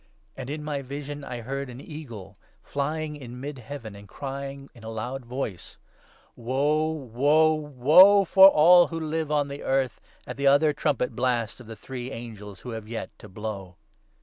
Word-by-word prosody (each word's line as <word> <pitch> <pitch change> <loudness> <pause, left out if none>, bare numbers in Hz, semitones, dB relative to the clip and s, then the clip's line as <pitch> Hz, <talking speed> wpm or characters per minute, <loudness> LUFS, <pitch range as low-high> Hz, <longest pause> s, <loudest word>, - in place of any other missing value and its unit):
And, 130 0 -7
in 150 +1 -5
my 145 -2 -3
vision, 145 +2 -7
I 120 -3 -6
heard 135 +3 -4
an 125 0 -9
eagle 120 - -9 0.3
flying 150 +2 -3
in 125 -3 -9
mid 140 0 -6
heaven 115 -3 -8
13 100 - -11
and 100 - -14
crying 140 +1 -7
in 115 - -16
a 110 - -7
loud 120 +4 -5
voice 120 -9 -5 0.2
— - - -30
' - - -33
Woe, 145 +6 0
woe, 150 +2 +2
woe 155 +8 +6
for 190 +2 +8
all 175 0 +7
who 165 - -5
live 160 -1 -3
on 145 -1 +1
the 140 0 -7
earth, 135 -2 -1 0.2
at 125 - -7
the 140 0 +1
other 145 +2 +5
trumpet 140 -5 -1
blasts 120 -3 -1
of 120 - -13
the 115 - -8
three 125 +3 -7
angels 105 -5 -9
who 125 - -7
have 110 -2 -7
yet 115 0 -5
to 105 - -12
blow.' 95 -2 -6
135 Hz, 190 wpm, -26 LUFS, 120-150 Hz, 0.3 s, for